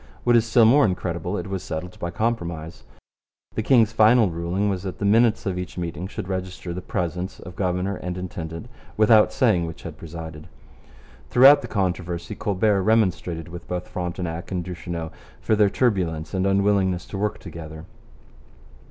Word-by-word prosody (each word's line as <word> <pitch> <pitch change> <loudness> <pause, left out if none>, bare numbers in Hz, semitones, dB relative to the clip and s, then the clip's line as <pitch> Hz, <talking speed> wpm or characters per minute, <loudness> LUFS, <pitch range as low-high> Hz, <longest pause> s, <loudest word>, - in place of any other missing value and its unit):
What 120 -1 +4
is 115 -1 +4
still 115 0 +5
more 140 +6 +6
incredible, 90 -1 -1
it - - -4
was 95 -1 -4
settled 90 +3 -6
by 85 - -3
compromise. 85 -6 -3 0.7
The - - -1
king's 115 -2 +4
final 110 -2 +5
ruling 85 +5 -1
was 95 -3 -1
that 95 -1 -6
the 100 - -2
minutes 115 +2 +3
of 90 -2 -1
each 90 0 -7
meeting 85 0 -4
should 95 - -6
register 95 -2 -4
the 90 - -5
presence 90 +1 -3
of 90 +1 -10
governor 90 +1 -1
and 90 0 -5
intendant 85 -3 -6 0.3
without 110 0 +5
saying 95 -9 +2
which 80 - -9
had - - -8
presided. 80 -1 -8 0.8
Throughout 135 +4 +7
the - - -6
controversy 90 -2 -2
Colbert 100 -1 +1
remonstrated 90 -6 +1
with 85 0 -9
both 90 0 -4
Frontenac 90 -2 -4
and 90 -2 -2
Duchesneau 85 -2 -5 0.3
for 110 - +1
their 105 -1 +4
turbulence 90 -10 0
and 95 0 +1
unwillingness 100 -2 +2
to 95 - -6
work 105 0 -1
together. 80 -2 -9
90 Hz, 165 wpm, -24 LUFS, 85-105 Hz, 0.8 s, Throughout